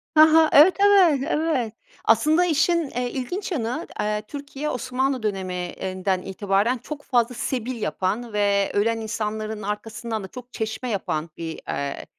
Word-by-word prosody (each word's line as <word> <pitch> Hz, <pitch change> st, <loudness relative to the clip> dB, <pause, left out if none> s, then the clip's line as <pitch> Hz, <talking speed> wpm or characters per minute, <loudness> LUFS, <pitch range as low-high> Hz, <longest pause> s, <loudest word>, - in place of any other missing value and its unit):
Ha 310 Hz, 0 st, +7 dB
ha. 320 Hz, -1 st, +6 dB
Evet, 315 Hz, +6 st, +8 dB
evet, 380 Hz, -9 st, +5 dB
evet. 300 Hz, -8 st, 0 dB, 0.3 s
Aslında 305 Hz, +10 st, +4 dB
işin, 335 Hz, -1 st, +2 dB
eee, 245 Hz, 0 st, -2 dB
ilginç 355 Hz, +10 st, -4 dB
yanı 260 Hz, 0 st, -2 dB
d -, -, -13 dB
eee, 210 Hz, 0 st, -1 dB
Türkiye, 285 Hz, +2 st, -5 dB
Osmanlı 255 Hz, -1 st, -1 dB
döneminden 185 Hz, -1 st, -2 dB
itibaren 200 Hz, +5 st, 0 dB
çok 290 Hz, +4 st, -8 dB
fazla 245 Hz, -1 st, +1 dB
sebil 245 Hz, 0 st, -3 dB
yapan 210 Hz, +6 st, -2 dB
ve 200 Hz, -1 st, +2 dB
ölen 225 Hz, +3 st, +2 dB
insanların 215 Hz, -1 st, -3 dB
arkasından 215 Hz, +2 st, -4 dB
da -, -, -6 dB
çok 250 Hz, +4 st, -11 dB
çeşme 220 Hz, +3 st, -3 dB
yapan 170 Hz, -6 st, -2 dB
bir, 165 Hz, -1 st, -5 dB
eee, 140 Hz, -1 st, -3 dB
230 Hz, 150 wpm, -24 LUFS, 205-285 Hz, 0.3 s, Evet